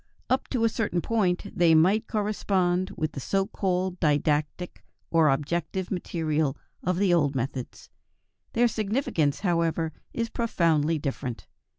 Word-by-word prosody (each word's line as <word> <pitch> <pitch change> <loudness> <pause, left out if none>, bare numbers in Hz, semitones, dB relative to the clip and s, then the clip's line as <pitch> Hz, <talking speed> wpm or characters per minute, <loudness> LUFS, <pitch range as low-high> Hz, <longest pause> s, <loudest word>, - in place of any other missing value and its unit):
Up 260 - +1
to 245 -4 0
a - - +5
certain 220 -6 -1
point, 185 -3 0
they 170 -2 +5
might 190 +7 +4
correspond 190 -4 0
with 155 0 -1
the 140 - -6
so 195 +8 0
called 185 -3 -1
didactic 150 +3 0 0.3
or 165 -2 +5
objective 170 +6 -1
material 155 -6 -1 0.2
of 180 0 0
the 190 -2 +3
old 145 -5 +2
methods. 130 0 -4 0.6
Their 240 +1 +4
significance, 210 - 0
however, 165 -3 0 0.2
is 230 0 -2
profoundly 165 -8 +1
different. 135 -4 -4
175 Hz, 130 wpm, -27 LUFS, 155-195 Hz, 0.6 s, a